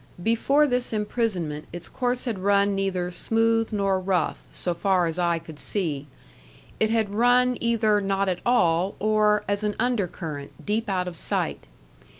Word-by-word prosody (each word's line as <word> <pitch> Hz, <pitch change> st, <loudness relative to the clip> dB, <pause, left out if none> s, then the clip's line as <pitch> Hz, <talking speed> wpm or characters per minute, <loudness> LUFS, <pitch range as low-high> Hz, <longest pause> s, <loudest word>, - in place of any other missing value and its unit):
Before 275 Hz, +7 st, +3 dB
this 250 Hz, -4 st, -1 dB
imprisonment 205 Hz, -8 st, -2 dB
its 175 Hz, 0 st, -7 dB
course 245 Hz, -1 st, -2 dB
had 225 Hz, -6 st, -2 dB
run 200 Hz, +1 st, +3 dB
neither 190 Hz, -2 st, -1 dB
smooth 225 Hz, +4 st, +1 dB
nor 195 Hz, -2 st, +1 dB
rough, 185 Hz, -3 st, 0 dB
so 175 Hz, -, -2 dB
far 185 Hz, +1 st, +2 dB
as 165 Hz, +1 st, -3 dB
eye 170 Hz, -1 st, +2 dB
could 160 Hz, -2 st, -10 dB
see; 150 Hz, -8 st, -2 dB, 0.7 s
it 220 Hz, -, +3 dB
had 220 Hz, -3 st, 0 dB
run 245 Hz, +3 st, +4 dB
either 220 Hz, -3 st, +2 dB
not 195 Hz, 0 st, 0 dB
at 180 Hz, -2 st, -1 dB
all, 180 Hz, -5 st, +2 dB
or, 210 Hz, 0 st, +2 dB
as 205 Hz, +1 st, -1 dB
an 210 Hz, -1 st, -1 dB
undercurrent, 180 Hz, -, -2 dB
deep 215 Hz, +1 st, -1 dB
out 185 Hz, -2 st, 0 dB
of 180 Hz, -, -5 dB
sight. -, -, -2 dB
200 Hz, 155 wpm, -25 LUFS, 180-225 Hz, 0.7 s, run